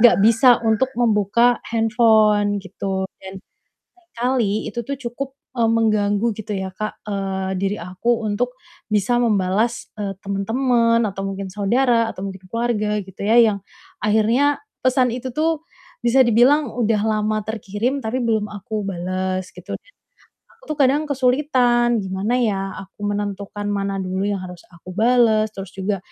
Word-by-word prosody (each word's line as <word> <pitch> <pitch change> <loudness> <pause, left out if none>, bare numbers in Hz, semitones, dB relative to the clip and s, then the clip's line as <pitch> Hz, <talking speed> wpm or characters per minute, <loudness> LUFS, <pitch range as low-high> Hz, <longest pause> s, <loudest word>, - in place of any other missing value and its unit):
enggak 240 0 +7
bisa 230 +3 +6
untuk 220 +3 +2
membuka 235 +1 +3
handphone 220 -3 +3
gitu 190 0 -3 0.2
dan 190 0 -9 0.6
seringkali 245 - -1
itu 235 -1 -5
tuh 280 +4 -4
cukup, 260 +2 -4 0.3
eee, 230 - +2
mengganggu 215 -1 +2
gitu 215 -1 -6
ya, 190 -1 -2
Kak, 215 0 -5
eee, 195 -1 -2
diri 195 +2 -1
aku 185 +7 -1
untuk 245 +5 -1 0.4
bisa 210 +4 +2
membalas, 220 0 +1
eee, 205 -2 -3
temen-temen 230 +4 +1
atau 195 0 -5
mungkin 195 0 -4
saudara 230 +4 +1
atau - - -10
mungkin 190 -1 -10
keluarga 215 -3 0
gitu 190 0 -8
ya 230 +3 +6
yang 215 -3 +3 0.5
akhirnya 230 +7 +2 0.2
pesan 255 0 +3
itu 255 0 -5
tuh 320 +3 0 0.4
bisa 240 +3 +4
dibilang 255 +5 +4
udah 225 -2 0
lama 215 0 0
terkirim, 220 +5 -3
tapi 245 +4 -1
belum 220 -3 0
aku 210 +1 -4
balas 185 0 -3
gitu - - -9
dan - - -11 0.6
aku 465 - -29
tuh - - -19
kadang 280 +2 +3
kesulitan, 250 -3 +2
gimana 190 +5 -2
ya 210 -5 +1 0.3
aku 195 - -31
menentukan 205 0 -4
mana 200 -1 -1
dulu 190 +1 -2
yang 200 -1 -1
harus 180 -1 -9
aku 175 +1 -12
balas, 220 -1 +3
terus 195 -1 -7
juga, 195 +1 -2
215 Hz, 145 wpm, -21 LUFS, 195-240 Hz, 0.6 s, enggak